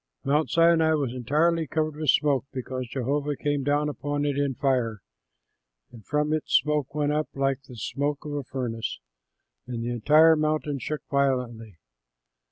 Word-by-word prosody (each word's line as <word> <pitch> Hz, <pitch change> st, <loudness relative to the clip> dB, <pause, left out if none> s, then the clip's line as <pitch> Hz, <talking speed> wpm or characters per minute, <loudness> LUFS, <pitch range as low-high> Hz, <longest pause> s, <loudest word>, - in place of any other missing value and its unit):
Mount 150 Hz, +2 st, +1 dB
Sinai 165 Hz, -1 st, +4 dB
was 140 Hz, -5 st, -1 dB
entirely 155 Hz, +6 st, +1 dB
covered 155 Hz, +1 st, -1 dB
with 155 Hz, -1 st, -2 dB
smoke, 140 Hz, -4 st, +3 dB
because 130 Hz, -1 st, -5 dB
Jehovah 140 Hz, +3 st, -1 dB
came 145 Hz, 0 st, -1 dB
down 145 Hz, +2 st, +1 dB
upon 145 Hz, 0 st, -2 dB
it 145 Hz, -1 st, 0 dB
in 140 Hz, -2 st, 0 dB
fire. 120 Hz, -7 st, 0 dB, 0.9 s
And 115 Hz, -3 st, -13 dB
from 150 Hz, +4 st, 0 dB
it 155 Hz, -, -1 dB
smoke 150 Hz, -1 st, +1 dB
went 145 Hz, -1 st, +1 dB
up 155 Hz, 0 st, -1 dB
like 135 Hz, 0 st, 0 dB
the 125 Hz, -, -11 dB
smoke 145 Hz, +8 st, -3 dB
of 150 Hz, -, -5 dB
a 145 Hz, -1 st, -2 dB
furnace, 120 Hz, -3 st, -4 dB, 0.7 s
and 120 Hz, -2 st, -4 dB
the 120 Hz, -, -2 dB
entire 150 Hz, +7 st, +5 dB
mountain 155 Hz, -2 st, -1 dB
shook 150 Hz, +5 st, -4 dB
violently. 125 Hz, -7 st, -1 dB
145 Hz, 160 wpm, -26 LUFS, 130-150 Hz, 0.9 s, entire